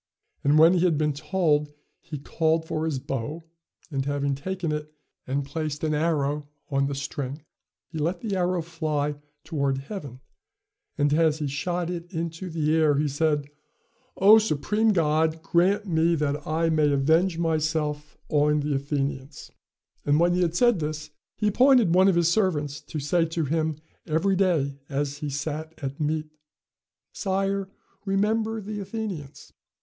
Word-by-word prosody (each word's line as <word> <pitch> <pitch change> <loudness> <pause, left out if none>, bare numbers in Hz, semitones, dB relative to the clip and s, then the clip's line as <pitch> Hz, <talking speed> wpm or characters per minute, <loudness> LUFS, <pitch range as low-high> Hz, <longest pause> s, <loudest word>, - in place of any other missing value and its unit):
And 145 +2 +4
when 165 +3 +7
he 180 - +2
had 170 -4 +3
been 150 -1 +1
told, 150 -1 0 0.3
he 150 - -7
called 160 +3 0
for 155 0 -2
his 155 -4 -1
bow; 135 +5 -4 0.5
and, 135 -2 -1
having 140 0 -1
taken 175 +4 -3
it, 150 0 -4 0.4
and 135 +2 -1
placed 150 0 -4
an 155 -1 +1
arrow 150 -2 0 0.2
on 140 0 +2
the 140 - -3
string, 140 +1 -5 0.4
he 160 - -7
let 170 +4 -1
the 210 -4 -2
arrow 180 -1 0
fly 155 -3 -2 0.3
toward 140 -3 -1
heaven; 140 - -7 0.8
and 145 -1 +2
as 160 -1 +3
he 150 - -3
shot 175 +5 -2
it 175 0 -6
into 165 +1 -4
the 155 -1 +1
air, 155 -2 +4
he 150 +1 +1
said, 145 0 0 0.7
'Oh! 210 +3 +8
supreme 215 +3 +1
God, 160 -2 +1
grant 195 +5 +2
me 170 -2 +2
that 150 -1 -2
I 165 +1 +1
may 155 -2 +3
avenge 160 +6 +2
myself 155 -2 -1
on 150 0 +2
the 145 0 -1
Athenians,' 140 0 -3 0.5
And 145 +1 +3
when 175 +1 +4
he 180 - +1
had 170 -1 +1
said 240 -2 +4
this, 155 0 -4 0.2
he 210 - +1
appointed 245 -4 +5
one 185 +2 +6
of 190 - +4
his 170 -1 +3
servants 160 -7 0
to 155 - -6
say 165 +4 +1
to 165 -1 -2
him 160 +1 0 0.3
every 175 +5 +1
day 160 -8 +1
as 145 0 -2
he 150 - -3
sat 155 +3 -4
at 135 -1 -5
meat, 155 0 -1 0.9
'Sire, 195 0 -1 0.3
remember 215 +3 0
the 210 +1 -5
Athenians.'" 195 -8 -6
155 Hz, 160 wpm, -26 LUFS, 145-175 Hz, 0.9 s, Oh